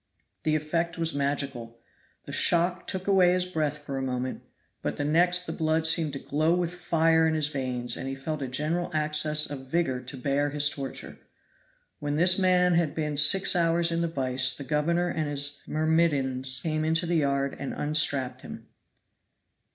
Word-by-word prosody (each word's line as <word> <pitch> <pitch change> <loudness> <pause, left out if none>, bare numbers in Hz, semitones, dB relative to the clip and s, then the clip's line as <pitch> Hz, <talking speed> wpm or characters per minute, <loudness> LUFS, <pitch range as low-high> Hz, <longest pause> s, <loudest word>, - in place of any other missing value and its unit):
The 155 0 0
effect 165 +2 -2
was 165 -1 -1
magical; 140 -5 -3 0.5
the - - -8
shock 175 +2 +3
took 190 0 -4
away 185 -3 +4
his 180 0 0
breath 155 -4 -2
for 140 -2 -6
a - - -3
moment, 130 -1 -3 0.4
but - - -3
the 145 - -2
next 175 +4 +3
the - - -5
blood 160 0 0
seemed 160 -2 +2
to - - -3
glow 155 +5 0
with 175 -1 -2
fire 165 -2 +2
in 160 - 0
his 150 -2 0
veins 125 -4 -3
and - - -6
he 135 - -4
felt 150 +2 -5
a 135 - -3
general 155 +7 -2
access 150 0 0
of 135 -2 -8
vigor 135 -6 0
to 130 +2 -9
bear 140 +3 0
his 145 0 +3
torture. 135 -3 -7 0.8
When 145 0 -3
this 180 +4 +5
man 180 -1 +3
had 165 -3 +1
been 150 -2 -2
six 155 +7 +5
hours 170 0 +2
in 165 0 0
the 170 - 0
vise 130 -4 +1
the 140 - -6
governor 165 +5 0
and 155 -3 -2
his 145 0 -1
myrmidons 140 -5 0
came 155 -1 -1
into 160 +2 +1
the 170 0 0
yard 140 -2 0
and 140 - -4
unstrapped 140 -4 0
him. - - -10
155 Hz, 180 wpm, -27 LUFS, 140-170 Hz, 0.8 s, this